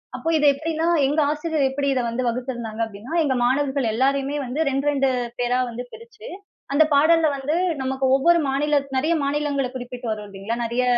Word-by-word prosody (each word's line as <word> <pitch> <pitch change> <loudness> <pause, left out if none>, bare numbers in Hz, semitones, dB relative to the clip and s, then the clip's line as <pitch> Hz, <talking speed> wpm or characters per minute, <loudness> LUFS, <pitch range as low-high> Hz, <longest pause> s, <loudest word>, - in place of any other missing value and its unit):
அப்போ 325 - -3
இது 295 - +1
எப்பிடின்னா, 320 +2 -2 0.2
எங்க 290 +3 +1
ஆசிரியர் 305 -1 0
எப்பிடி 280 +1 -2
இத 255 - 0
வந்து 245 +2 -2
வகுத்திருந்தாங்க 235 -2 -4
அப்பிடின்னா, 225 +6 -7
எங்க 280 -3 +1
மாணவர்கள் 270 +1 +1
எல்லாரையுமே 275 +3 0
வந்து 255 +5 -4
2, 275 +1 -1
2 275 -2 +1 0.3
பேரா 245 0 +1
வந்து 240 +1 -6
பிரிச்சு, 460 -1 -12 0.5
அந்த 300 +3 +6
பாடல்ல 315 +2 +4
வந்து 280 +3 -2 0.3
நமக்கு 265 0 -1
ஒவ்வொரு 340 +5 +4
மாநிலத் 280 0 0
நிறைய 310 +6 +1
மாநிலங்கள 280 -1 -1
குறிப்பிட்டு 245 -1 -7
வரும் 210 -1 -5
இல்லேங்களா, 200 +4 -5
நிறைய 240 +2 0
275 Hz, 170 wpm, -22 LUFS, 245-295 Hz, 0.5 s, அந்த